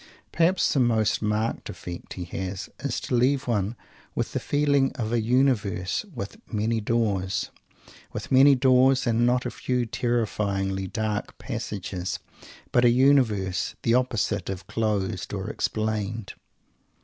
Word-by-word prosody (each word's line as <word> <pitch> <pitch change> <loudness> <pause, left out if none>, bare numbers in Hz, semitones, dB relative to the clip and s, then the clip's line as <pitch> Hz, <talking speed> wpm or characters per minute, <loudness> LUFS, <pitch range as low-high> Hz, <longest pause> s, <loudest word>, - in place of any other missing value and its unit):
Perhaps 170 +3 +3
the 140 - +2
most 110 -5 +2
marked 105 +1 -1
effect 85 -1 -7
he 90 - -5
has 95 +2 -5
is 140 - -2
to - - -4
leave 130 +3 +3
one 105 -1 0 0.4
with - - -2
the - - 0
feeling 145 -2 +2
of 115 -3 -3
a 120 - +2
universe 110 - +1
with 105 - -6
many 110 +1 0
doors; 100 -4 0 0.6
with - - -6
many 135 +2 +7
doors, 130 0 +4
and 120 0 +2
not 125 +1 +2
a - - -2
few 125 -1 -1
terrifyingly 100 -5 -1
dark 105 +1 -3
passages; 95 -2 -4 0.5
but 120 - +4
a 120 - +7
universe 120 -8 +2
the 115 - +3
opposite 115 -6 0
of 95 -2 -5
"closed" 100 -4 -2
or 95 +3 -4
"explained." 110 -1 -2
110 Hz, 135 wpm, -26 LUFS, 100-125 Hz, 0.6 s, many